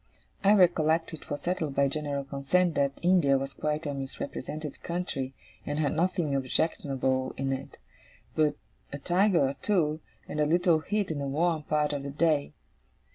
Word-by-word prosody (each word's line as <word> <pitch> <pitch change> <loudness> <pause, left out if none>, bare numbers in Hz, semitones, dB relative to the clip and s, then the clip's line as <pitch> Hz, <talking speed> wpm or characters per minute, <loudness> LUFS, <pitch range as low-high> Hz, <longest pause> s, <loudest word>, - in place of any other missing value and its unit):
I 200 +2 +6
recollect 165 -4 +3
it 160 - -10
was 145 - -3
settled 165 -5 -2
by 140 - +4
general 145 0 -2
consent 140 +6 +1
that 140 -1 0
India 170 -7 +4
was 135 0 -4
quite 150 +3 -2
a 145 - -2
misrepresented 140 +2 -6
country, 135 -7 -3 0.3
and 145 0 -3
had 150 -2 +1
nothing 170 -2 0
objectionable 130 -1 0
in 135 0 0
it, 135 - -7 0.6
but 155 -1 +2 0.4
a 140 - -4
tiger 175 0 +3
or 140 - -5
two, 160 -7 +1 0.3
and 150 - -4
a 150 - +3
little 170 0 +3
heat 205 +2 -1
in 150 - -3
the 140 - -2
warm 160 +3 +1
part 150 0 0
of 145 - -2
the 140 - -5
day. 150 0 +1
150 Hz, 170 wpm, -28 LUFS, 140-170 Hz, 0.6 s, I